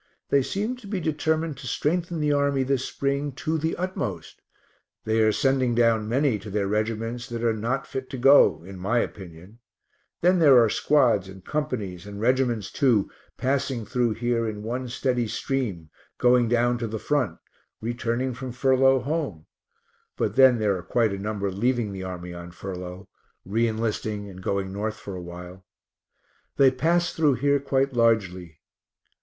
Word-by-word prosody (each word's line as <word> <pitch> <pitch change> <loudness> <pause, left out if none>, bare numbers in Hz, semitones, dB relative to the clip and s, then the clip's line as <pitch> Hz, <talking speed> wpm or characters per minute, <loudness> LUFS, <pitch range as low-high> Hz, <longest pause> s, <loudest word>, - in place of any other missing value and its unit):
They 140 - +4
seem 210 - -2
to 235 -5 -13
be 195 -2 -2
determined 160 -1 -1
to 130 - -8
strengthen 170 +6 -1
the 150 -1 +2
army 140 -1 +2
this 130 -1 0
spring 140 +1 -2
to 160 +3 -2
the 160 +2 -1
utmost. 140 - -4 0.6
They 110 +1 +2
are 110 0 +4
sending 130 0 +1
down 115 -2 +2
many 130 -2 +1
to 105 +2 -9
their 100 0 -1
reg'ts 115 +3 -2
that 115 -1 -4
are 115 -1 +2
not 120 +5 -2
fit 130 -1 -6
to 135 - -5
go 120 - +5
in 95 +1 -10
my 105 +7 0
opinion 95 -1 -5 0.6
then 180 +1 +4
there 145 -6 +7
are 115 -3 +5
squads 120 -10 +2
and 95 -1 -12
companies, 110 - -3
and 100 0 -8
reg'ts, 120 -3 +1
too, 120 -8 +2 0.3
passing 130 -3 -1
through 120 -1 0
here 115 -1 0
in 105 -1 -7
one 125 +3 -3
steady 125 -1 0
stream, 105 - -3 0.3
going 125 -1 +4
down 120 +1 +2
to 115 - -2
the 110 +1 -4
front, 125 - -1 0.4
returning 120 +2 -2
from 130 +1 -6
furlough 130 +1 +3
home; 135 - -3 0.7
but - - -1
then 130 -2 +7
there 105 -3 +1
are 90 - -5
quite 110 +4 +1
a 100 - -4
number 100 -1 -2
leaving 115 +2 0
the 95 -1 -6
army 90 -1 -6
on 85 0 -8
furlough, 90 +1 -7 0.4
re 115 +5 +1
enlisting, 110 -2 -2
and 95 0 -11
going 95 0 -2
North 110 +2 -3
for 100 -3 -8
a 90 - -6
while. 90 +2 -10 0.9
They 135 -1 +6
pass 170 +6 +1
through 150 -4 +3
here 140 +3 +2
quite 135 0 0
largely. 95 -9 0
120 Hz, 170 wpm, -25 LUFS, 100-135 Hz, 0.9 s, there